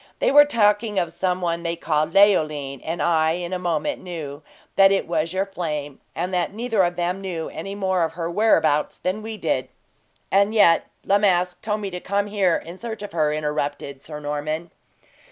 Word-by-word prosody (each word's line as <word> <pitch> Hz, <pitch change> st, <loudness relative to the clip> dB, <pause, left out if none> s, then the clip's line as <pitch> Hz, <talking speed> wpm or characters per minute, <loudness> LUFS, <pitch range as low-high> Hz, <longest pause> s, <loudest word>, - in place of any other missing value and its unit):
They -, -, +2 dB
were 290 Hz, +1 st, +8 dB
talking 210 Hz, -5 st, +2 dB
of 175 Hz, -3 st, 0 dB
some 180 Hz, +1 st, -1 dB
one 170 Hz, -1 st, -1 dB
they 170 Hz, 0 st, -2 dB
called 155 Hz, -1 st, 0 dB
Leoline, 155 Hz, -9 st, +3 dB
and 165 Hz, +2 st, -2 dB
I, 160 Hz, -1 st, +3 dB
in 175 Hz, +1 st, -4 dB
a 185 Hz, -, -1 dB
moment, 170 Hz, -4 st, -1 dB
knew 155 Hz, -5 st, -7 dB, 0.3 s
that 195 Hz, 0 st, +6 dB
it 195 Hz, -, +1 dB
was 165 Hz, -1 st, -1 dB
your 190 Hz, +1 st, 0 dB
flame, 150 Hz, -7 st, -4 dB, 0.2 s
and 180 Hz, +3 st, -3 dB
that 180 Hz, -1 st, 0 dB
neither 225 Hz, -2 st, 0 dB
of 175 Hz, -1 st, +1 dB
them 180 Hz, +2 st, -2 dB
knew 175 Hz, -4 st, -4 dB
any 195 Hz, +5 st, -6 dB
more 190 Hz, -3 st, +1 dB
of 160 Hz, -, -2 dB
her 165 Hz, 0 st, -3 dB
whereabouts 170 Hz, -6 st, +2 dB
than 185 Hz, +4 st, -2 dB
we 220 Hz, 0 st, -6 dB
did." -, -, -1 dB, 0.6 s
"And 200 Hz, +3 st, +3 dB
yet 170 Hz, -6 st, +5 dB, 0.2 s
La 200 Hz, +1 st, +3 dB
Masque 180 Hz, -3 st, +1 dB
told 210 Hz, 0 st, -2 dB
me 200 Hz, -2 st, -4 dB
to 180 Hz, -, -5 dB
come 200 Hz, +3 st, -1 dB
here 200 Hz, -4 st, +1 dB
in 175 Hz, +3 st, -7 dB
search 225 Hz, -3 st, -6 dB
of 205 Hz, -, -7 dB
her," 155 Hz, -2 st, +1 dB
interrupted 145 Hz, -2 st, -3 dB
Sir 150 Hz, -1 st, -8 dB
Norman. 150 Hz, +3 st, -4 dB
175 Hz, 195 wpm, -23 LUFS, 160-200 Hz, 0.6 s, were